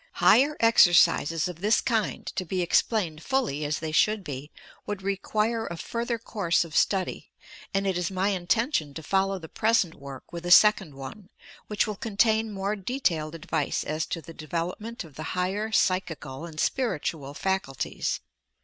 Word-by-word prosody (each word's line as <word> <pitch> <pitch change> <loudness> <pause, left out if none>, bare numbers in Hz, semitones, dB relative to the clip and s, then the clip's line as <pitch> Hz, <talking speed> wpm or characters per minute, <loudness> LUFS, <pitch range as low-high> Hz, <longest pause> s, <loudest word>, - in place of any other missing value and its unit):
Higher 290 +4 +4
exercises 175 -7 +5
of 180 -3 -7
this 210 +2 +3
kind, 225 -4 -1
to 185 - -1
be 180 +1 -2
explained 175 -3 +1
fully, 240 - -1
as 150 +1 -1
they 160 -1 -4
should 210 +6 +2
be, 145 -2 -6 0.4
would 205 -2 -4
require 215 +3 -1
a 170 - -5
fur 235 +7 -3
ther 235 -1 -1
Course 200 -7 0
of 160 -1 -10
study; 190 -2 0 0.4
and 195 0 0
it 190 -2 0
is 175 - -1
my 190 +1 0
intention 185 - 0
to 160 - -6
fol 195 +4 +2
low 195 0 -2
the 165 -3 -9
present 215 -3 +1
work 140 +2 -11
with 170 0 -6
a 175 - -3
second 190 -4 +6
one, 140 +9 -9 0.2
— - - -20
which 210 -3 +1
will 210 -2 -4
contain 220 +1 +1
more 200 +1 -2
detailed 180 - -1
advice 160 -3 -2
as 155 +1 -2
to 165 - -4
the 165 - -10
development 175 +9 -4
of 160 -4 -14
the 155 - -5
higher 200 +4 -1
psychical 170 -7 -1
and 155 -2 -9
spiritual 155 - -1
faculties. 190 -9 -2
185 Hz, 175 wpm, -27 LUFS, 160-215 Hz, 0.4 s, second